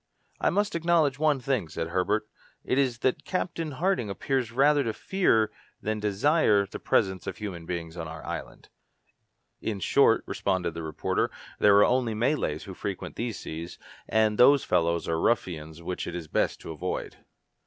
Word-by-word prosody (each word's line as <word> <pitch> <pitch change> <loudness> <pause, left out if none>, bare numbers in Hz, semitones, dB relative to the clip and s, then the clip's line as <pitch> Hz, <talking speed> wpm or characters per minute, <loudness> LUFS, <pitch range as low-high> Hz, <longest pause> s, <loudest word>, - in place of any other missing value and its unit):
"I - - +2
must 205 +3 0
acknowledge 165 -5 +2
one 150 -3 +3
thing," 125 -7 -1
said 80 +2 -4
Herbert, 100 +5 0 0.4
"it 130 - +1
is 130 -3 +1
that 130 +2 +1
Captain 165 -3 -3
Harding 175 - 0
appears 125 +3 -1
rather 145 +4 +4
to 115 -3 -2
fear 115 - +2 0.3
than 110 0 -2
desire 105 +1 +3
the - - -8
presence 95 -1 +1
of 95 -2 -4
human 90 -6 -6
beings 85 -2 -4
on 85 -2 -5
our 80 0 -8
island." - - -7 0.9
"In 105 -3 -3
short," - - +4
responded 90 -4 -1
the 85 - -5
reporter, 80 -1 -1 0.3
"there 100 -1 +6
are 105 - +7
only 120 -3 +1
Malays 115 - 0
who 95 - -8
frequent 95 0 -5
these 115 -2 -3
seas, 80 +2 -7 0.3
and 110 -1 +2
those 140 +2 +7
fellows 85 -1 +1
are 80 0 0
ruffians 80 -7 -1
which 90 +1 -4
it 90 - -5
is 85 -3 -5
best - - 0
to - - -7
avoid." 80 - -4
105 Hz, 170 wpm, -27 LUFS, 85-135 Hz, 0.9 s, are